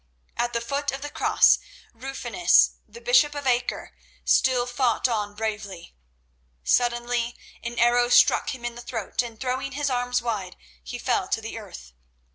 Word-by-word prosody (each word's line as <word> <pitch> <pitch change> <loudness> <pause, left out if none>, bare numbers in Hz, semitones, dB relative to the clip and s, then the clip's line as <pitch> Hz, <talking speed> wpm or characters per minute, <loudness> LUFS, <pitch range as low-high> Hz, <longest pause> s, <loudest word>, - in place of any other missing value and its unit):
At 240 0 -1
the 235 - -1
foot 280 +4 -2
of 270 +1 -6
the 290 - -5
Cross, - - +4 0.3
Rufinus, 270 +6 +2 0.2
the 470 - -13
bishop 405 -14 +4
of 285 -1 -5
Acre, 245 -1 -1 0.3
still 250 -2 +3
fought 245 -1 +1
on 210 -4 -2
bravely. 210 -5 -5 0.7
Suddenly 240 - +1 0.3
an 235 0 -6
arrow 240 +1 +4
struck 245 - +5
him 240 -2 -10
in 240 - -3
the 240 - -9
throat, 230 -3 -3
and 230 -2 -8
throwing 260 +1 -2
his 285 0 -1
arms 245 0 0
wide, 215 -6 -4 0.3
he - - -6
fell - - 0
to - - -3
earth. 60 0 -10
240 Hz, 155 wpm, -25 LUFS, 230-260 Hz, 0.7 s, struck